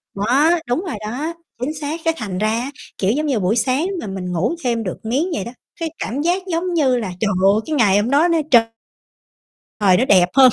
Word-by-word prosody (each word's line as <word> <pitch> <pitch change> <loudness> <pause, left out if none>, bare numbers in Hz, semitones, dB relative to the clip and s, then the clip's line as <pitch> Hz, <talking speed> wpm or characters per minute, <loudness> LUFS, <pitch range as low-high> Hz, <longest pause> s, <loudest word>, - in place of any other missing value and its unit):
Đó, 255 +10 +3 0.2
đúng 315 +11 -1
rồi 305 - -3 0.2
đó, 305 +7 -3 0.3
chính 295 +5 -2
xác, 305 +2 -4
cái 325 - +3
thành 200 -5 -4
ra 215 +2 +1
á, 240 +5 -2 0.3
kiểu, 195 +2 +1
giống 305 +5 -1
như, 265 -7 0
buổi 190 +4 +1
sáng 260 - +1
mà 215 - -6
mình 185 -2 -5
ngủ 180 - 0
thêm 235 -2 0
được 180 - -4
miếng 275 +10 0
vậy 195 - -3
đó, 235 - -6 0.3
cái 330 -1 -2
cảm 270 +5 -3
giác, 355 +3 0
giống 345 +2 -1
như 265 -6 +2
là, 215 -6 -3
trời 215 - +1
ơi, 200 +3 +4
cái 315 - -2
ngày 205 -6 +4
hôm 225 +4 -1
đó 295 +5 +4
nó, 335 -1 +2
trời 235 -2 +7 1.2
trời 190 -3 +4
nó 255 - +2
đẹp 180 -6 +4
hơn, 260 -2 +8
250 Hz, 235 wpm, -19 LUFS, 205-305 Hz, 1.2 s, hơn